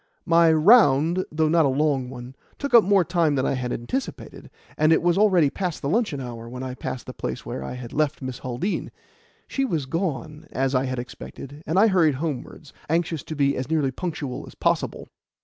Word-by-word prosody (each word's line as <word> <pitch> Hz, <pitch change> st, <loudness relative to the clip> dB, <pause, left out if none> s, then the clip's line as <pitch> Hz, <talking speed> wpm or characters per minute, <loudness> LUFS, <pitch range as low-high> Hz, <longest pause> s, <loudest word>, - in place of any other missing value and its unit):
My 165 Hz, -2 st, +5 dB
"round," 165 Hz, -, +5 dB
though 155 Hz, 0 st, +1 dB
not 165 Hz, +1 st, +4 dB
a -, -, +1 dB
long 135 Hz, -2 st, 0 dB
one, 125 Hz, 0 st, -9 dB, 0.2 s
took 280 Hz, -3 st, -4 dB
up 235 Hz, -2 st, +9 dB
more 195 Hz, -2 st, +3 dB
time 170 Hz, -4 st, +1 dB
than 130 Hz, -, 0 dB
I -, -, +1 dB
had 125 Hz, -2 st, -3 dB
anticipated, 190 Hz, -, -5 dB, 0.3 s
and 155 Hz, +1 st, +3 dB
it 160 Hz, -, +4 dB
was 175 Hz, -1 st, +3 dB
already 185 Hz, -8 st, +4 dB
past 180 Hz, -6 st, -4 dB
the 140 Hz, -, -1 dB
luncheon 205 Hz, -, 0 dB
hour 120 Hz, -3 st, -7 dB
when 125 Hz, +1 st, -6 dB
I 130 Hz, -1 st, -4 dB
passed 130 Hz, -1 st, -6 dB
the -, -, -7 dB
place -, -, -5 dB
where 65 Hz, -, -5 dB
I 65 Hz, -, -5 dB
had 125 Hz, -1 st, -8 dB
left 150 Hz, -2 st, 0 dB
Miss 130 Hz, -2 st, -6 dB
Haldean. 130 Hz, +11 st, -3 dB, 0.6 s
She 270 Hz, -, -1 dB
was 165 Hz, -, -1 dB
gone, 155 Hz, -1 st, -3 dB
as 135 Hz, +1 st, 0 dB
I 130 Hz, 0 st, +2 dB
had 130 Hz, 0 st, -3 dB
expected, 135 Hz, +3 st, -8 dB
and 160 Hz, -, 0 dB
I 205 Hz, -, +7 dB
hurried 175 Hz, -9 st, +3 dB
homewards, 150 Hz, 0 st, -5 dB, 0.2 s
anxious 165 Hz, -1 st, 0 dB
to 155 Hz, -, -6 dB
be 140 Hz, -1 st, +2 dB
as 130 Hz, +2 st, -4 dB
nearly 150 Hz, -4 st, +1 dB
punctual 145 Hz, -4 st, -5 dB
as -, -, -13 dB
possible. -, -, -1 dB
150 Hz, 205 wpm, -24 LUFS, 130-170 Hz, 0.6 s, up